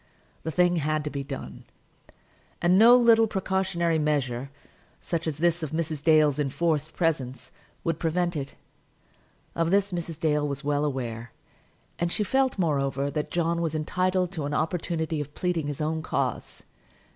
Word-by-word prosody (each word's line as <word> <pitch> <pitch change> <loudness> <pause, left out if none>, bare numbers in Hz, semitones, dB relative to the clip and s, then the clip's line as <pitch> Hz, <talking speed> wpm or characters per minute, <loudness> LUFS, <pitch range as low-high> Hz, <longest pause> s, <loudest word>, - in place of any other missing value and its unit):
The 160 - -4
thing 175 +2 +3
had 155 0 0
to 150 - -4
be 140 -1 -3
done, 135 - -7 1.0
and 175 +1 +3
no 235 +3 +9
little 230 -2 +5
precautionary 190 -4 0
measure, 135 -4 -1 0.5
such 170 -1 -3
as 150 -3 -2
this 170 +1 +1
of 155 -2 -4
Mrs. 160 -2 -2
Dale's 155 -2 +4
enforced 155 +2 0
presence, 140 -7 -1 0.3
would 165 -2 -1
prevent 175 +1 0
it. 140 -2 -5 1.0
Of 165 0 0
this 200 +1 +2
Mrs. 165 -2 -4
Dale 150 -3 +1
was 140 0 -4
well 145 +1 +1
aware; 120 -4 -4 0.7
and 170 0 0
she 210 - +1
felt, 265 +5 +1
moreover, 140 -5 0
that 150 0 -3
John 170 0 0
was 160 -2 -1
entitled 180 +3 0
to 160 -6 -4
an 145 0 -2
opportunity 160 -1 -1
of 145 0 -8
pleading 175 -4 -1
his 145 0 -4
own 160 +1 -1
cause. 160 - -3
160 Hz, 155 wpm, -26 LUFS, 145-175 Hz, 1.0 s, no